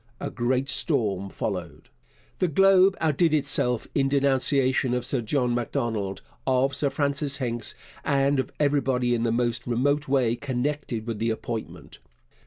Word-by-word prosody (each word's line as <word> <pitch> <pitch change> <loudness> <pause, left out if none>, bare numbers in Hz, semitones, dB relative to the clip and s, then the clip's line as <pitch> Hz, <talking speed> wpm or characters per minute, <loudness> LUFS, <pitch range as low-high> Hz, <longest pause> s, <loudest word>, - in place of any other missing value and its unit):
A - - -4
great 130 +2 0
storm 105 - 0
followed. - - -5 0.5
The 185 - +2
Globe 195 +3 +5
outdid 160 +1 +2
itself 125 -5 +1
in 135 -1 +1
denunciation 135 -2 +2
of 125 -1 -2
Sir 130 -1 -1
John 125 +1 0
Macdonald, 115 -6 -2 0.2
of 130 +1 +2
Sir 140 0 +1
Francis 140 0 0
Hincks, 120 -4 -2 0.3
and 140 0 +2
of 130 - -2
everybody 135 -4 +1
in 120 - 0
the 115 -1 +1
most 120 0 -1
remote 140 +5 +1
way 130 -4 +2
connected 130 -2 -3
with 115 -3 -4
the 115 +1 0
appointment. 110 0 -6
130 Hz, 145 wpm, -25 LUFS, 120-140 Hz, 0.5 s, Globe